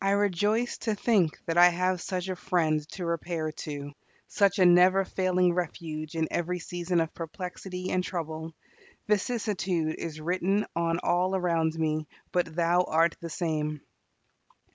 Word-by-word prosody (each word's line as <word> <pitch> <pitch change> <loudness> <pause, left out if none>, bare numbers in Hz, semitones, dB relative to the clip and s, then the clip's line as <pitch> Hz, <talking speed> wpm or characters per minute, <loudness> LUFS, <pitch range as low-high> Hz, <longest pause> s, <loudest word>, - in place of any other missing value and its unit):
I 195 0 +3
rejoice 205 +4 +1
to 220 -2 -1
think 200 -7 +2
that 165 +1 +1
I 175 0 +9
have 180 +1 0
such 185 -1 -3
a 185 - -2
Friend 165 -4 +1
to 180 - -5
repair 170 -1 -2
to 145 -2 -6 0.4
such 200 -2 +2
a 185 - +5
never 180 +2 +6
failing 185 -1 +2
refuge 160 -3 -4
in 160 -1 0
every 175 +1 -1
season 175 +1 -2
of 165 -1 -1
perplexity 180 +2 -6
and 185 0 +1
trouble; 160 -2 -5 0.5
vicissitude 195 -6 0
is 155 -2 -5
written 185 +5 0
on 165 0 +1
all 180 +2 +2
around 165 -3 +1
me, 155 -1 -1 0.2
but 180 -1 +1
"Thou 175 +1 +3
art 165 +1 +2
the 170 - -6
same." 155 -2 -2
175 Hz, 150 wpm, -28 LUFS, 160-185 Hz, 0.5 s, I